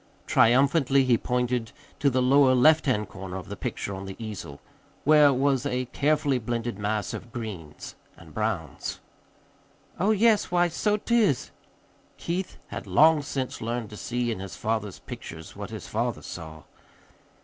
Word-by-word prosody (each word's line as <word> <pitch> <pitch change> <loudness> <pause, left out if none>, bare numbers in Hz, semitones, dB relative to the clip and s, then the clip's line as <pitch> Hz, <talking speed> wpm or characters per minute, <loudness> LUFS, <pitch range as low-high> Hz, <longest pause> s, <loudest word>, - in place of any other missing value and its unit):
Triumphantly 135 +3 +4
he 125 -2 +4
pointed 125 -1 -1 0.3
to 140 - +3
the 130 -1 +1
lower 130 0 +5
left 155 +4 +5
hand 105 -6 +1
corner 95 0 -7
of 95 - -9
the - - -5
picture 100 - -4
on 95 0 -6
the 95 - -7
easel, 105 -10 -7 0.4
where 150 -1 +6
was 135 -1 +1
a 130 -3 -1
carefully 145 -2 +2
blended 115 -2 -3
mass 105 +1 -1
of 120 - -8
greens 100 -11 -7 0.2
and 80 -2 -15
browns. 105 - -3 1.0
"Oh, 195 +5 +2
yes, 220 0 +3
why, 175 0 +3
so't 210 +6 -1
is." 215 - +2 0.7
(Keith 180 +2 -3
had - - -6
long 155 0 +5
since 135 -2 -4
learned 115 -1 -3
to - - -8
see 120 +2 -2
in 110 - -4
his 95 -1 -7
father's 110 -3 -2
pictures - - -9
what - - -6
his - - -7
father - - -2
saw.) 80 -3 -8
125 Hz, 155 wpm, -26 LUFS, 105-145 Hz, 1.0 s, where